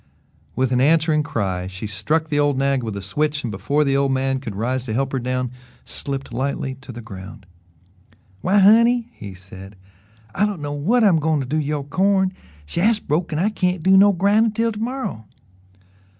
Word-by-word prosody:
With 130 0 0
an 125 0 +2
answering 155 +1 +3
cry, 95 -10 -2
she 95 +3 -7
struck 140 - -1
the 145 -1 +1
old 145 -2 +2
nag 135 -1 +1
with 110 -4 -5
a 100 - -6
switch 150 +9 -1
and 120 - -3
before 140 +9 0
the 135 -1 +1
old 140 0 +2
man 135 0 0
could 115 -7 -7
rise 125 +4 -2
to 110 - -4
help 135 +1 -1
her 135 - -1
down, 125 0 -2 0.3
slipped 135 -3 -5
lightly 135 +1 -2
to 135 - -10
the 120 -1 -9
ground. 100 -1 -10 1.0
"Why, 195 +3 +2
honey," 230 +4 +5
he 100 -3 -9
said, 95 +2 -12 0.6
"I 210 - +2
don't 205 -5 -4
know 145 0 -4
whut 220 +12 +2
I'm 185 -6 +5
goin' 155 0 +1
to - - -4
do 145 +5 -2
'bout 155 - -1
yo' 145 -1 -2
corn. 190 +5 +1 0.3
Shaft's 205 - +1
broke 165 -1 -2
an' 150 - -2
I 190 +6 +2
can't 180 -5 -1
do 190 +1 +5
no 200 +1 +7
grindin' 205 +4 +2
till 230 +1 0
to 210 - -7
morrow." 230 - -4
145 Hz, 200 wpm, -21 LUFS, 125-185 Hz, 1.0 s, no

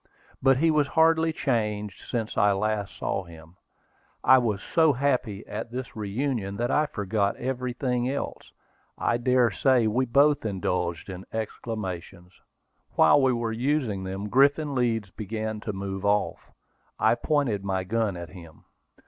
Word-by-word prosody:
But 135 -1 +4
he 160 +3 +3
was 150 -2 +2
hardly 160 0 +4
changed 105 -8 -2
since 115 -2 -2
I 100 0 +4
last 105 0 -2
saw 95 - -2
him. 80 0 -14 0.7
I 130 - +7
was 110 -5 -1
so 160 - +3
happy 125 -6 -1
at 110 +2 -5
this 125 0 -6
reunion 105 -1 -2
that 120 +2 -1
I 150 0 +2
forgot 100 -4 -1
everything 125 0 -2
else. 140 - -5 0.5
I 120 - +1
dare 125 -1 +3
say 125 +3 +3
we 125 +4 +1
both 140 +4 +4
indulged 90 -4 -2
in 95 -1 -7
exclamations. 95 -5 -5 0.6
While 145 - +6
we 130 -1 +4
were 115 -2 -1
using 120 -5 -1
them, 95 +2 -4
Griffin 140 +5 +3
Leeds 115 -6 0
began 110 +1 -4
to 105 - -4
move 95 0 -5
off. 105 0 0 0.5
I - - +4
pointed 135 -10 0
my 95 -1 -1
gun 110 -1 -1
at 85 -2 -7
him. 85 -2 -13
110 Hz, 150 wpm, -26 LUFS, 100-130 Hz, 0.7 s, I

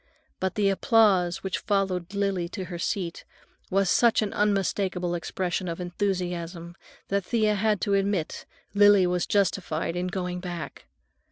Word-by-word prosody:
But 190 0 -1
the 205 -2 +2
applause 195 -4 +3
which 190 -1 -2
followed 195 -2 -1
Lily 195 -4 0
to 190 0 -5
her 175 -1 -7
seat 175 -2 -3 0.5
was 195 +1 +2
such 230 +4 +4
an 205 - -3
unmistakable 195 -3 0
expression 180 +1 -2
of 170 0 -4
enthusiasm 175 -2 -3 0.4
that 200 0 0
Thea 215 -3 +2
had 210 0 +1
to 200 - 0
admit 195 -4 -1 0.3
Lily 205 -2 +6
was 180 0 0
justified 180 -5 0
in 180 +1 -1
going 180 -1 -3
back. 175 -6 -7
190 Hz, 145 wpm, -26 LUFS, 175-200 Hz, 0.5 s, Lily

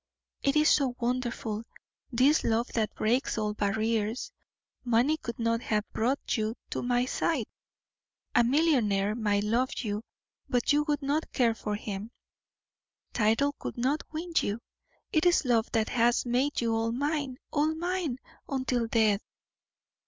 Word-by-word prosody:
It 275 +1 +1
is 305 0 +5
so 265 -4 +2
wonderful 240 -3 -2 0.5
this 265 +6 +4
love 230 +1 +1
that 220 -2 -1
breaks 240 +4 +1
all 210 -1 0
barriers; 220 - -1 0.5
money 245 +5 +3
could 235 -7 -6
not 230 0 0
have 210 -3 -1
brought 255 +3 0
you 220 +1 -1 0.2
to - - -2
my 245 0 +1
side 260 -1 0 0.9
a 240 - +5
millionaire 235 -8 +2
might 205 -3 +1
love 235 +5 +1
you, 210 -3 -2 0.5
but 245 +3 +2
you 295 0 +2
would 295 -1 0
not 290 +3 -1
care 235 -4 +3
for 210 -2 -3
him; 205 0 -5 1.0
title 225 +6 +2
could - - -6
not 265 +5 +1
win 335 +2 -5
you 205 +3 -2 0.5
it 315 +2 +3
is 345 -4 +3
love 230 -3 +2
that 220 -1 +1
has 240 +1 +2
made 250 +4 +1
you 230 -1 +1
all 225 0 0
mine! 285 0 -1
All 310 +1 +1
mine, 345 -5 -2 0.3
until 255 -3 0
death!" 220 -3 +3
240 Hz, 145 wpm, -29 LUFS, 220-280 Hz, 1.0 s, is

